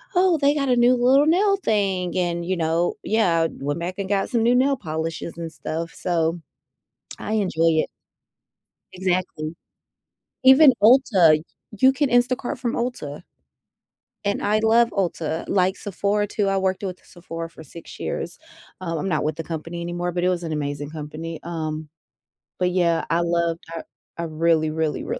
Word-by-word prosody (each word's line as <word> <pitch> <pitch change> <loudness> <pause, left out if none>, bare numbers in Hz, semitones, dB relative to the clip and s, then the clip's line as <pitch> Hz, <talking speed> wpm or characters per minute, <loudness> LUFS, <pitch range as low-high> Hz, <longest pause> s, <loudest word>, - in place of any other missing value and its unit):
"Oh, 360 -2 +4
they 285 -1 +3
got 280 -2 -1
a 250 - +4
new 245 +1 +5
little 260 +4 +4
nail 390 +6 +3
thing" 195 - 0
and, 170 -1 -1
you 185 0 -1
know 165 +1 0
Yeah, 170 -7 +2
went 145 +3 -4
back 175 +2 -4
and 195 -1 -4
got 200 -1 0
some 235 -3 +1
new 240 +1 +4
nail 270 +2 +3
polishes 160 -1 -4
and 165 -1 -5
stuff, 165 0 -5
so, 170 0 -1 0.8
I 215 - -4
enjoy 165 -6 +2
it. - - -5 1.0
Exactly. 180 -4 -2 0.9
Even 265 +2 +8
Ulta 195 - +5 0.4
you 265 0 +6
can 285 0 0
Instacart 245 +2 +1
from 240 -2 -2
Ulta 180 - -4 1.0
and 200 0 0
I 210 +1 +2
love 230 +1 +4
Ulta, 165 -4 -2
like, 185 0 +2
Sephora 205 +1 -1
too; 205 -1 -1
I 195 - +1
worked 190 0 -1
with 185 -2 -4
Sephora 165 -1 -7
for 160 - -13
6 165 +3 -12
years. - - -4 0.4
Um, 165 -3 -3
I'm 195 - -2
not 155 -3 0
with 155 0 -1
the 165 - -4
company 165 +1 -6
anymore, 175 +1 -3
but 175 0 -2
it 180 - +3
was 175 -1 -1
an 160 -2 -3
amazing 145 -1 -3
company. 160 +1 -6
Um, 155 -2 -4 0.7
but, 180 0 +1
yeah, 170 -2 +1
I 165 +2 +2
loved 170 -1 0
Tar 165 -1 -6 0.3
I 170 - -3
really, 160 0 +1
really, 155 -1 -1
really 475 +2 -4
175 Hz, 170 wpm, -23 LUFS, 165-220 Hz, 1.0 s, Even